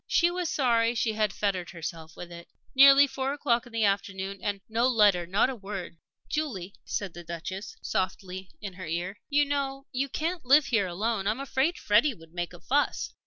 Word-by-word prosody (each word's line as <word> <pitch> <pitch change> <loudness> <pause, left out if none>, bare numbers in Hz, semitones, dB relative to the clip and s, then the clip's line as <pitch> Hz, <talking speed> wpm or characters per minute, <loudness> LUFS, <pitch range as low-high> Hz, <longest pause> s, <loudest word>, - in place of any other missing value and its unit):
She 345 0 +3
was 355 -2 -2
sorry 235 -4 +2
that - - -5
she 220 0 +1
had 215 -1 +1
fettered 190 -4 -2
herself 165 -2 -7
with 175 0 -8
it.... 170 0 -10 0.3
Nearly 275 +1 +8
four 270 0 -2
o'clock 245 -4 0
in - - -15
the 225 -1 0
afternoon, 195 -1 -1
and 205 -1 -2
no 230 +3 +2
letter 205 -8 +4
not 200 +8 +2
a - - -6
word! 195 -5 -7 0.3
"Julie," 205 - -3
said 195 -4 -3
the 175 - -9
Duchess, 170 +4 -6
softly, 185 0 -3
in 200 -3 -6
her 185 -1 -8
ear, 175 +5 -3
"you 290 0 +3
know 275 -1 -2
you 275 +2 -1
can't 330 +5 -2
live 275 +3 +6
here 225 -6 +1
alone. 200 +3 -1
I'm 215 +5 0
afraid 275 +5 0
Freddie 230 +6 +3
would 165 -3 -17
make 175 -1 -3
a 175 - -12
fuss." 285 +9 0
210 Hz, 200 wpm, -28 LUFS, 185-270 Hz, 0.3 s, Nearly